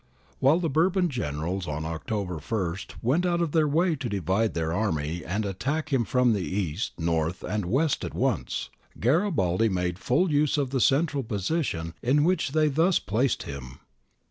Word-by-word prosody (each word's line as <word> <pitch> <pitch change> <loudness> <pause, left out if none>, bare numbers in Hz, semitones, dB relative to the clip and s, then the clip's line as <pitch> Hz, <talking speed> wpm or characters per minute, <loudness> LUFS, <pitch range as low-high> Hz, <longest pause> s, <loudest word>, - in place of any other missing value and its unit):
While 140 +5 +5
the 175 - 0
Bourbon 175 +5 +2
generals 90 - -3
on 75 +1 -3
October 90 +1 -3
i 95 -7 0 0.3
went 140 +9 +2
out 175 -1 +1
of 170 -3 0
their 155 -1 +3
way 165 +3 +2
to 130 -3 -4
divide 100 +3 0
their 80 -1 -1
army 85 -5 -1
and 105 +5 -2
attack 140 - -2
him 120 -4 +2
from 125 -2 +3
east, 95 -1 -2
north, 80 +1 -1
and 105 -3 -2
west 140 - +1
at - - -5
once, - - -1 0.3
Garibaldi 115 - +2
made 90 -1 -1
full 155 - +1
use 150 0 +2
of 140 -3 -1
the 135 -2 0
central 145 +2 +2
position 100 - -2
in 140 +4 +3
which 175 -5 +1
they 155 -1 +3
thus 165 +6 +3
placed 120 +7 0
him. 65 -2 -8
115 Hz, 170 wpm, -26 LUFS, -, 0.3 s, While